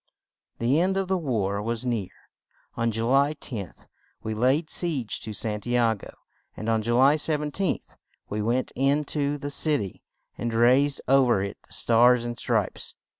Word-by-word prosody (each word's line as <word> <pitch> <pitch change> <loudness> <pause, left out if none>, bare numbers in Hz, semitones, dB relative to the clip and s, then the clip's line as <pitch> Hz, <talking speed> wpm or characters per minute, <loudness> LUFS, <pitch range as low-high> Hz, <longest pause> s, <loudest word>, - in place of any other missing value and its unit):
The 125 +6 +2
end 190 +2 +1
of 195 -1 -1
the 190 - +2
war 105 - -1
was 115 +2 -3
near; 115 -7 -1 0.7
on 115 0 0
Ju 115 +1 -2
ly 140 +4 +3
10th 110 - -7 0.4
we 110 - -3
laid 130 +8 +2
siege 150 - -1
to 110 - -6
San 105 0 -2
ti 120 +3 -2
a 115 -2 +3
go, 100 - -11 0.5
and 110 - -5
on 110 -1 +2
Ju 120 +2 0
ly 135 +4 +5
17th 150 +4 -2 0.3
we 105 +1 -3
went 120 +4 0
in 140 +3 +2
to 145 0 -1
the 145 0 -5
cit 150 +1 +1
y 100 -4 -6 0.4
and 115 -1 -2
raised 130 +5 +3
ov 135 -1 +4
er 100 -5 +2
it 100 - -6
the - - -8
Stars 120 +1 +4
and 120 0 -5
Stripes. - - -2
125 Hz, 180 wpm, -26 LUFS, 115-145 Hz, 0.7 s, ly